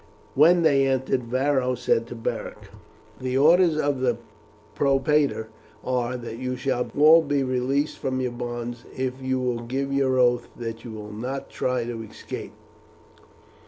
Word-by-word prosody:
When 170 Hz, +5 st, +5 dB
they 140 Hz, -3 st, +4 dB
entered 130 Hz, -1 st, 0 dB
Varo 130 Hz, +1 st, +1 dB
said 115 Hz, -1 st, 0 dB
to 120 Hz, -, -7 dB
Beric: 115 Hz, -, -5 dB, 0.5 s
"The 130 Hz, 0 st, -1 dB
orders 165 Hz, +3 st, +5 dB
of 145 Hz, -3 st, 0 dB
the 130 Hz, -1 st, +1 dB, 0.6 s
propraetor 140 Hz, -4 st, +2 dB, 0.3 s
are, 125 Hz, -1 st, -1 dB
that 115 Hz, -1 st, -7 dB
you 125 Hz, 0 st, -2 dB
shall 125 Hz, -1 st, -1 dB
all 155 Hz, +3 st, +8 dB
be 145 Hz, -3 st, 0 dB
released 130 Hz, +3 st, -1 dB
from 130 Hz, -1 st, -2 dB
your 125 Hz, -1 st, -1 dB
bonds 120 Hz, 0 st, -5 dB
if 130 Hz, 0 st, -3 dB
you 130 Hz, 0 st, -1 dB
will 125 Hz, -2 st, -1 dB
give 135 Hz, +3 st, -3 dB
your 135 Hz, -2 st, +2 dB
oath 120 Hz, -1 st, +3 dB
that 115 Hz, -1 st, -6 dB
you 120 Hz, -, -8 dB
will 105 Hz, -1 st, -8 dB
not 125 Hz, +6 st, -5 dB
try 125 Hz, -1 st, -1 dB
to 120 Hz, -1 st, -5 dB
escape." 110 Hz, -, -8 dB
130 Hz, 155 wpm, -25 LUFS, 120-140 Hz, 0.6 s, all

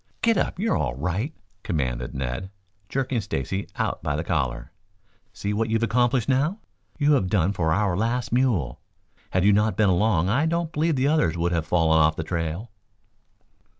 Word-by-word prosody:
"Get 230 Hz, 0 st, +4 dB
up! -, -, -1 dB
You're 220 Hz, +4 st, +1 dB
all -, -, -1 dB
right," 90 Hz, -, -2 dB, 0.3 s
commanded 65 Hz, -9 st, -2 dB
Ned, 65 Hz, +7 st, -3 dB, 0.4 s
jerking 130 Hz, -3 st, -1 dB
Stacy 95 Hz, -, -3 dB
out -, -, -2 dB
by 75 Hz, -2 st, -1 dB
the 75 Hz, -, -2 dB
collar. 65 Hz, -6 st, -2 dB, 0.6 s
"See 100 Hz, +1 st, -3 dB
what 110 Hz, +2 st, 0 dB
you've 115 Hz, +1 st, +1 dB
accomplished 120 Hz, +1 st, +2 dB
now. 140 Hz, +8 st, +1 dB, 0.4 s
You 150 Hz, 0 st, +3 dB
have 115 Hz, -10 st, +2 dB
done 95 Hz, -1 st, +2 dB
for 80 Hz, -5 st, 0 dB
our 95 Hz, +1 st, +1 dB
last 115 Hz, +5 st, -1 dB
mule. 115 Hz, -, +1 dB, 0.5 s
Had 95 Hz, 0 st, +1 dB
you 105 Hz, -, +6 dB
not 105 Hz, +2 st, +2 dB
been 110 Hz, -3 st, +4 dB
along 90 Hz, -2 st, +2 dB
I 135 Hz, +11 st, +2 dB
don't 170 Hz, 0 st, -1 dB
believe 155 Hz, +1 st, +1 dB
the 130 Hz, +1 st, +1 dB
other 155 Hz, -, +3 dB
one 85 Hz, +1 st, -5 dB
would 85 Hz, +1 st, +1 dB
have 85 Hz, -2 st, -1 dB
fallen 80 Hz, -2 st, +3 dB
off 80 Hz, 0 st, +4 dB
the 80 Hz, -, -3 dB
trail." 85 Hz, +6 st, -3 dB
100 Hz, 185 wpm, -24 LUFS, 80-125 Hz, 0.6 s, you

